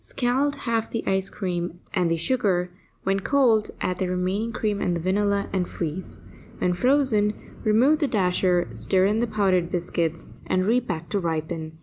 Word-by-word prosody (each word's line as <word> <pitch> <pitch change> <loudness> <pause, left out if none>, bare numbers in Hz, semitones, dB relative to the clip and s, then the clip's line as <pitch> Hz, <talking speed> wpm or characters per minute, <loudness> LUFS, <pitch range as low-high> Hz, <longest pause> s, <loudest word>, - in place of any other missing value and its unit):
Scald 270 +3 0
half 230 -1 0
the 230 - -3 0.3
cream 175 -3 -3
and 180 -4 +1
the 165 - +1
sugar; 180 -2 +1 0.3
when 195 +1 +1
cold, 230 -2 +3
add 180 -1 -1
the 185 - 0
remaining 185 +5 -1
cream 210 -2 -1
and 175 -1 0
the - - -4
vanilla, 200 +3 +1
and 185 -2 0
freeze. 170 +2 -5 0.4
When 180 - +1
frozen, 235 -2 +2 0.3
remove 250 +8 +4
the 290 - +2
dasher, 180 -4 +2
stir 190 -1 +2
in 210 +3 +2
the 240 - +1
powdered 190 -5 +1
biscuits, 170 -2 -2 0.2
and 185 0 +1
repack 190 -8 0
to 200 - 0
ripen. 160 -1 -3
190 Hz, 160 wpm, -25 LUFS, 175-220 Hz, 0.4 s, remove